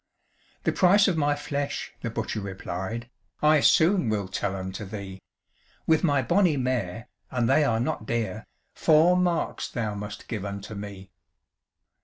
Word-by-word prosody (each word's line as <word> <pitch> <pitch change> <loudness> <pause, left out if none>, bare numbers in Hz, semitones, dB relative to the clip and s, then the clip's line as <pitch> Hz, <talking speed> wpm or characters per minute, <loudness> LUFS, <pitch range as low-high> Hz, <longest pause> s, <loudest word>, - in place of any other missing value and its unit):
"The - - +2
price 195 +2 +5
of 190 - +2
my 145 -2 +2
flesh," 145 -1 -3
the - - -3
butcher 105 - -3
replied, 95 +3 -5 0.3
"I 150 0 +5
soon 165 - +4
will 105 -3 -1
tell 95 +1 -2
unto 95 +2 -5
thee; 95 -1 -7 0.6
With 160 +1 +3
my 145 -5 +3
bonny 175 +1 +3
mare, 120 -4 -2 0.2
and 120 -2 0
they 155 - +4
are 115 -6 +1
not 115 -2 -2
dear, 115 -1 -2 0.3
Four 165 +3 +5
marks 175 -2 0
thou 110 -4 -2
must 105 +1 -7
give 110 -5 -4
unto 100 +1 -6
me." 100 -2 -8
115 Hz, 150 wpm, -26 LUFS, 100-150 Hz, 0.6 s, price